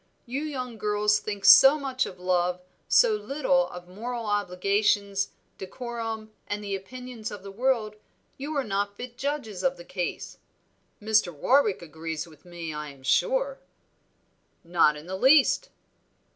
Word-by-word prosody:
You 260 +3 -3
young 255 -7 -5
girls 210 0 +2
think 205 -2 -5
so 270 +3 +9
much 265 -2 -1
of 180 - -10
love, 180 0 +1 0.3
so 485 -3 +5
little 275 -7 +1
of 180 0 -10
moral 230 +5 -5
obligations, 200 0 +1 0.3
decorum, 225 +1 -5 0.2
and 205 0 -3
the 200 -1 -2
opinions 240 +3 -7
of 205 -2 -9
the 200 - -8
world, 225 -1 0 0.4
you 290 +3 -4
are 275 - +1
not 200 -1 -2
fit 245 -1 -8
judges 260 -8 -3
of 270 - +1
the 175 - -11
case. 180 -2 -5 0.6
Mr. 215 -4 +2
Warwick 210 - +2
agrees 160 0 -5
with 155 -2 -18
me, 170 -3 -6
I 150 0 -5
am 140 -2 -15
sure." - - +1 1.0
"Not 165 -3 +3
in 150 - -11
the 185 +2 -5
least." 275 - +4
210 Hz, 145 wpm, -27 LUFS, 180-255 Hz, 1.0 s, so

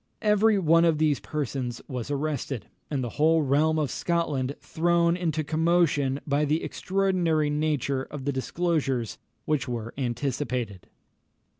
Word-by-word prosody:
Every 210 0 +4
one 165 -2 +4
of 165 -2 +3
these 150 -2 +2
persons 130 -5 -3
was 125 -4 -5
arrested, 145 -4 -2 0.2
and 140 -4 -1
the 120 - -3
whole 160 0 +4
realm 150 +3 +2
of 150 -4 0
Scotland 150 -6 -1
thrown 170 +1 +2
into 160 -3 -1
commotion 155 -3 +2
by 145 0 +1
the 150 +2 +1
extraordinary 180 -6 0
nature 150 -3 0
of 135 0 -7
the 140 - +1
disclosures 135 -4 -1 0.3
which 150 -3 0
were 115 -2 -4
anticipated. 120 -5 -2
150 Hz, 135 wpm, -26 LUFS, 135-165 Hz, 0.3 s, Every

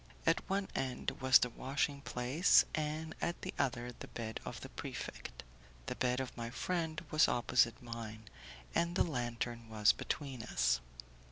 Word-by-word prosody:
At - - +4
one 195 0 +1
end 130 -2 -1
was 130 0 +8
the 125 - 0
washing 140 +3 -1
place, 135 +7 +4
and 155 +1 -2
at 170 - -2
the - - -3
other 125 -2 0
the 120 - -9
bed 110 -1 -5
of - - -6
the - - -7
prefect. - - -6 0.4
The - - -2
bed 125 0 +1
of 130 -1 -4
my 115 -1 -4
friend 160 +3 -1
was 155 +1 +6
opposite 120 -1 +3
mine, 115 -2 -6 0.5
and 170 +1 +1
the - - +5
lantern 120 -5 -3
was 105 -1 +5
between 135 -5 -4
us. 60 - +2
125 Hz, 160 wpm, -35 LUFS, 115-150 Hz, 0.5 s, was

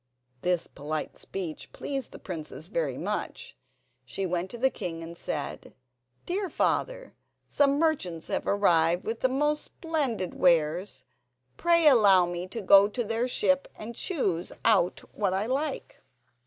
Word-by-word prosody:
This 180 -2 +1
polite 150 +2 -5
speech 175 -5 -6
pleased 270 -3 -4
the - - -9
princess 165 -6 -7
very - - -1
much. - - -4 0.5
She 195 - -4
went 180 +1 -2
to 240 - -7
the 265 +2 +2
king 165 -1 -5
and 165 +1 -8
said: 150 -4 -5 0.5
"Dear 380 +1 -2
father, - - -1 0.3
some 280 -1 +3
merchants 275 - 0
have - - -2
arrived 175 -4 +3
with 225 +1 -3
the 260 - +2
most 295 +3 +1
splendid 275 - -2
wares. 170 -3 +2 0.5
Pray 335 -1 +3
allow 200 -9 +6
me 175 +1 -4
to 225 +4 -5
go 195 +1 +7
to 240 +4 -3
their 225 +3 -1
ship 275 +2 +1
and 225 +2 -7
choose 195 - -2
out 200 -6 +3
what 195 -3 0
I 195 +2 0
like." 275 +4 -3
205 Hz, 145 wpm, -28 LUFS, 175-275 Hz, 0.5 s, go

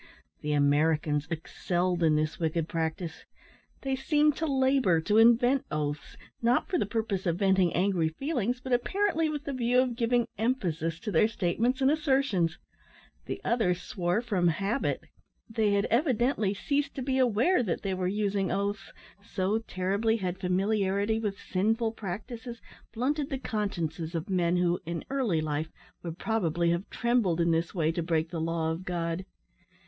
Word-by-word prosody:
The 150 0 -1
Americans 150 +1 +2
excelled 175 +2 -1
in 160 -2 +4
this 155 0 -1
wicked 160 -1 0
practice. 165 +1 -3 0.6
They 270 -1 -1
seemed 295 +2 +2
to 320 - -1
labour 265 - +3
to 210 +6 +3
invent 245 +4 +5
oaths, 150 -1 -3 0.2
not 235 +1 +2
for 355 - 0
the - - 0
purpose 205 -3 -2
of 170 0 +1
venting 190 -3 +3
angry 180 -3 +2
feelings, 245 - -2
but 255 0 -3
apparently 330 +5 +1
with 295 -1 -4
the 280 - -4
view 250 0 +2
of 255 -2 +1
giving 240 0 +1
emphasis 175 - -1
to 220 - -3
their 215 - +4
statements 225 +6 0
and 265 +1 +4
assertions. 270 - +1 0.7
The - - -4
others 195 -7 +1
swore 180 +4 -1
from 195 -7 +1
habit. 200 - 0 0.4
They 220 -2 +1
had 200 0 +2
evidently 240 - +2
ceased 285 +6 -1
to 265 - -3
be 265 0 0
aware 255 - +3
that 195 -8 -2
they 195 -2 -1
were 185 -1 -1
using 200 -1 0
oaths 200 0 -2 0.3
so 200 +2 -1
terribly 205 +2 0
had 185 -3 -3
familiarity 200 +3 +1
with 205 -3 -3
sinful 220 +4 0
practices 225 +4 -6 0.3
blunted 275 +5 -1
the 270 - -2
consciences 175 - -3
of 165 +5 -3
men 175 -1 +2
who, 175 0 +1
in 170 0 -5
early 235 -13 +1
life, 155 0 -2 0.3
would 170 -1 -6
probably 175 -7 0
have 170 +3 -2
trembled 235 -8 +1
in 170 0 +3
this 165 +3 0
way 160 -2 +2
to 170 - -2
break 165 -1 0
the 165 -2 -3
law 165 0 0
of 165 +3 -4
God. 170 0 -3
200 Hz, 165 wpm, -29 LUFS, 170-240 Hz, 0.7 s, invent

